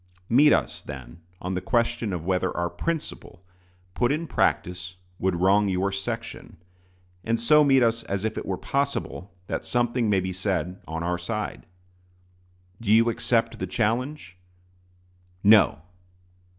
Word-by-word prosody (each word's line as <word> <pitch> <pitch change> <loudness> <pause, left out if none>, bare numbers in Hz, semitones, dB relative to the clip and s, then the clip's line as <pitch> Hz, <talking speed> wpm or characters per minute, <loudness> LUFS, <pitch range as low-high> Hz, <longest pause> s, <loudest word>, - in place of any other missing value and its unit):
Meet 145 +6 +6
us, - - +1
then, 70 +4 -10 0.2
on 90 +1 -4
the 90 - -2
question 115 -2 0
of 85 -3 -4
whether 95 0 0
our 85 0 -1
principle, 95 - -5 0.5
put 120 +5 +1
in 155 +3 -1
practice, 90 - -1 0.2
would 95 -1 +1
wrong 100 +4 +3
your 95 +1 0
section; 100 -3 -5 0.7
and 115 +2 0
so 150 +6 +5
meet 135 -3 +5
us 115 0 +2
as 100 +1 -2
if 110 0 -2
it - - -5
were 95 - -1
possible 130 - -2
that - - -3
something 120 -1 0
may 100 -2 +3
be 95 0 -3
said 90 -2 -2
on 80 +1 -4
our 90 0 -1
side. 105 - -4 1.1
Do 105 -3 0
you 115 +2 +5
accept 115 0 0
the - - -3
challenge? 120 -3 -2 1.0
No! 100 -7 +5
100 Hz, 145 wpm, -25 LUFS, 90-115 Hz, 1.1 s, Meet